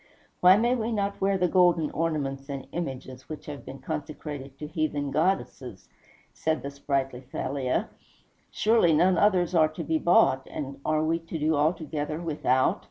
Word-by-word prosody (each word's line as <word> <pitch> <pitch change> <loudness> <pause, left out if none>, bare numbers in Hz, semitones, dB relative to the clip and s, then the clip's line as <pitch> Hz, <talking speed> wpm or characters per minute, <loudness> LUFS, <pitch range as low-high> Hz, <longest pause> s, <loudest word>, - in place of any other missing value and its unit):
"Why 185 +2 +7
may 240 +3 +2
we 235 -2 -1
not 200 -2 -2
wear 195 0 +2
the 180 -1 +2
golden 175 -3 +3
ornaments 145 -4 -2
and 140 -1 -5
images 130 -5 -6
which 155 - -7
have 145 -2 -7
been 130 +1 -9
consecrated 145 -1 -6
to 150 - -6
heathen 150 -3 -2
goddesses?" 135 - -2 0.4
said 160 0 -1
the 140 - -5
sprightly 135 -2 -2
Thalia; 130 0 -2 0.6
"surely 215 -7 +3
none 180 +4 +4
others 185 -4 +3
are 160 -3 +4
to 155 +2 -6
be 160 +1 0
bought, 135 -6 +3
and 140 -2 -6
are 155 0 +1
we 165 +1 +1
to 165 0 -6
do 155 +1 +1
altogether 155 0 -1
without?" 145 -6 +1
155 Hz, 165 wpm, -27 LUFS, 140-175 Hz, 0.6 s, Why